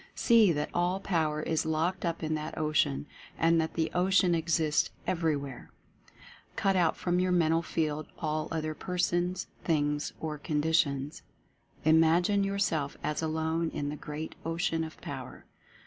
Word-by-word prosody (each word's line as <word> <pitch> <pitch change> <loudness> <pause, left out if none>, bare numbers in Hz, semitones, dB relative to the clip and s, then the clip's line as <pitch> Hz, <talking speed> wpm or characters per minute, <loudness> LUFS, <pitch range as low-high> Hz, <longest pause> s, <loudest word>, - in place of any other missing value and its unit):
See 225 -5 +5
that 150 -2 -2
ALL 180 +2 +1
POW 165 -6 0
ER 150 - -3
is 160 -1 0
locked 160 +4 -1
up 170 -1 -2
in 155 0 -1
that 155 0 -4
ocean, 150 -2 +1 0.3
and 165 0 +4
that 160 - -4
the 160 -1 0
ocean 185 0 +3
ex 165 0 +1
ists 155 -1 +2 0.2
EVERYWHERE. 145 -7 -2 0.9
Cut 195 -1 +2
out 175 -3 +2
from 180 0 0
your 185 0 +1
Mental 165 -2 +3
Field 155 -2 -2
all 155 -1 -2
other 155 -1 -2
persons, 180 +1 -1 0.2
things 150 -2 0
or 155 -2 -4
conditions. 150 -2 0 0.6
Imagine 165 +5 +4
yourself 195 -8 -1
as 150 - -1
alone 160 +1 -1
in 145 -2 -3
the 150 - -4
great 150 +1 -6
Ocean 165 0 -1
of 160 0 -8
Power. - - -7
160 Hz, 150 wpm, -30 LUFS, 155-175 Hz, 0.9 s, See